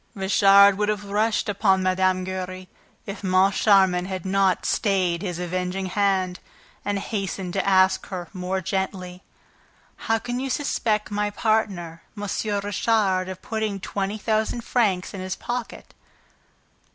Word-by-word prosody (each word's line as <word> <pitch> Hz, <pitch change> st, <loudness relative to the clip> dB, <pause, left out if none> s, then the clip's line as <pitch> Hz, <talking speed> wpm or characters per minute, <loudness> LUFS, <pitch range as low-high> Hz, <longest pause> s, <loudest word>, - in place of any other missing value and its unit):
Richard 200 Hz, 0 st, +5 dB
would 210 Hz, 0 st, +1 dB
have 205 Hz, -1 st, -2 dB
rushed 215 Hz, +2 st, +1 dB
upon 195 Hz, -2 st, +2 dB
Mme. 185 Hz, 0 st, +1 dB
Giry, 185 Hz, 0 st, -5 dB, 0.4 s
if 200 Hz, 0 st, -7 dB
Moncharmin 190 Hz, -1 st, +3 dB
had 190 Hz, -2 st, -5 dB
not 190 Hz, -1 st, +1 dB
stayed 185 Hz, -5 st, +1 dB
his 180 Hz, -4 st, -4 dB
avenging 180 Hz, +2 st, -3 dB
hand 190 Hz, -2 st, 0 dB, 0.4 s
and 205 Hz, 0 st, -1 dB
hastened 195 Hz, -3 st, -4 dB
to 195 Hz, 0 st, 0 dB
ask 190 Hz, 0 st, +3 dB
her, 180 Hz, -3 st, -6 dB
more 185 Hz, 0 st, -2 dB
gently: 185 Hz, -1 st, -3 dB, 0.9 s
"How 225 Hz, -, +4 dB
can 245 Hz, +2 st, -4 dB
you 270 Hz, +1 st, -3 dB
suspect 220 Hz, -7 st, -1 dB
my 205 Hz, 0 st, 0 dB
partner, 200 Hz, -6 st, -1 dB, 0.2 s
M. 205 Hz, -, -5 dB, 0.4 s
Richard, 205 Hz, -2 st, +1 dB
of 185 Hz, 0 st, -8 dB
putting 220 Hz, -4 st, -2 dB
twenty 195 Hz, +2 st, -3 dB
thousand 220 Hz, +2 st, -1 dB
francs 205 Hz, -7 st, 0 dB
in 195 Hz, -, -6 dB
his 185 Hz, 0 st, -3 dB
pocket?" 240 Hz, -1 st, -6 dB
195 Hz, 135 wpm, -24 LUFS, 185-210 Hz, 0.9 s, Richard